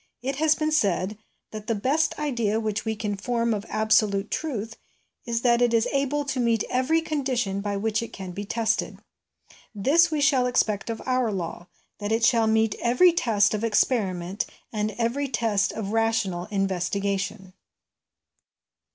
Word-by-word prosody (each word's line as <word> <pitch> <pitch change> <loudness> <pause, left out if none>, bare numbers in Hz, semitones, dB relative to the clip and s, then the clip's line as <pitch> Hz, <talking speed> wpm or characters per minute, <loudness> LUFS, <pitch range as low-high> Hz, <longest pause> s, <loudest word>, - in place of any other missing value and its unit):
It 270 +1 -2
has 310 +1 +3
been 310 0 -1
said 200 - +1 0.4
that 215 -1 -8
'The 230 - +1
best 270 +10 +1
idea 235 -8 0
which 215 -1 -2
we 220 0 -1
can 210 -1 -3
form 230 +3 -1
of 210 0 -4
absolute 215 -2 +2
truth 225 -8 -3 0.5
is 230 0 -1
that 240 -1 +3
it 240 -1 +3
is 225 - +2
able 280 +1 0
to 280 -2 -2
meet 230 -3 +2
every 260 +6 +2
condition 255 -11 -1
by 200 0 -2
which 220 +2 0
it 230 - -6
can 190 -2 -7
be 200 +3 -5
tested.' 225 +1 -1 0.8
This 310 - +4
we 310 -2 -1
shall 275 -3 +3
expect 215 -4 0
of 225 - -4
our 255 -3 +1
law 175 -2 -5 0.3
that 205 0 -3
it 225 0 +2
shall 230 -2 +3
meet 220 -1 +2
every 250 +9 +5
test 215 -10 +2
of 215 +1 -2
experiment 200 -5 0 0.3
and 210 0 -1
every 240 +5 0
test 220 -5 0
of 210 -2 -5
rational 225 -6 0
investigation. 195 0 -2
225 Hz, 160 wpm, -25 LUFS, 205-255 Hz, 0.8 s, every